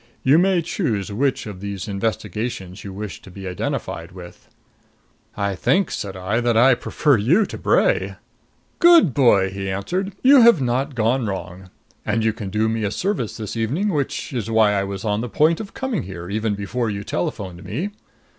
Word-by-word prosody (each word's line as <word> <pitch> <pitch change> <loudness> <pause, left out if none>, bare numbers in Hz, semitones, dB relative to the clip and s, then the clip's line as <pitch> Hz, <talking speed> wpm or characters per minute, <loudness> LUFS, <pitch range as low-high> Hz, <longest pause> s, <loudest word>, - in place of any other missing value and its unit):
You 140 +5 +5
may 185 -2 +2
choose 110 - -2
which 130 +6 0
of 105 -4 -8
these 100 0 -5
investigations 105 -1 -3
you 100 - -7
wish 95 -5 -7
to - - -13
be 95 +1 -8
identified 90 -1 -4
with." 90 -1 -12 0.9
"I 100 -1 0
think," 180 - +1
said 95 -2 -5
I, 95 +5 -1
"that 120 -1 +2
I 130 +3 +6
prefer 140 +2 +1
you 160 - +3
to - - -8
Bray." - - +1 0.6
"Good 340 - +6
boy!" 100 -8 +4
he 95 0 -4
answered. 180 - -2
"You 270 0 +8
have 235 -7 +7
not 130 +2 -1
gone 115 +1 +1
wrong. 95 -1 -6 0.3
And 110 +1 0
you 110 -1 +2
can 105 -3 -6
do 110 +3 +1
me 110 0 -1
a 105 - 0
service 175 - -2
this 110 -1 -5
evening, 135 - 0
which 145 -5 -2
is 115 -3 -3
why 110 -2 +4
I 100 -1 +1
was 100 +1 -5
on 105 0 0
the 125 - -4
point 155 +10 +2
of 205 -3 -8
coming 265 - -2
here, 90 -2 -8
even 110 0 -1
before 110 +4 -2
you 100 -1 -4
telephoned 90 0 -4
me. 140 - -4
110 Hz, 185 wpm, -21 LUFS, 100-140 Hz, 0.9 s, You